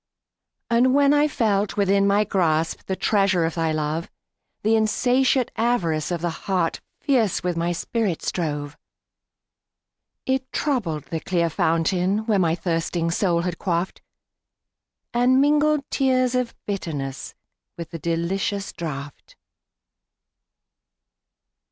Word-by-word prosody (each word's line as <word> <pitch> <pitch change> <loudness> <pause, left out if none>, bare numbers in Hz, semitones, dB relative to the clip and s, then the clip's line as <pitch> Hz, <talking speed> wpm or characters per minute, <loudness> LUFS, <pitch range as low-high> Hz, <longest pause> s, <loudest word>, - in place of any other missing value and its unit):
And 250 +3 +4
when 285 0 +5
I 295 +1 +4
felt 210 -7 0
within 200 0 +3
my 200 +1 +3
grasp, 165 -5 0
The 190 - -1
treasure 195 -4 +2
of 165 - -2
thy 165 -2 0
love; 155 +2 -2 0.5
The 220 +2 +3
insatiate 245 +3 +2
avarice 185 -10 0
of 175 -2 -2
the 175 -1 -1
heart 175 0 -2 0.2
Fierce 245 - +1
with 180 -1 -1
my 170 +1 0
spirit 190 0 -2
strove.It 165 - -7
troubled 200 - -1
the 165 +2 -4
clear 170 -1 0
fountain 180 +6 +1
where 215 -4 +2
My 165 -3 +2
thirsting 165 -1 -1
soul 170 -1 +1
had 175 -1 -3
quaffed, 175 -1 -2 1.1
And 250 +2 +4
mingled 300 +1 +3
tears 255 -2 +2
of 250 -1 -1
bitterness 145 -9 -4 0.4
With 165 -2 -7
the 165 - -6
delicious 195 +5 -2
draught. 145 -4 -7
190 Hz, 115 wpm, -23 LUFS, 165-235 Hz, 1.1 s, when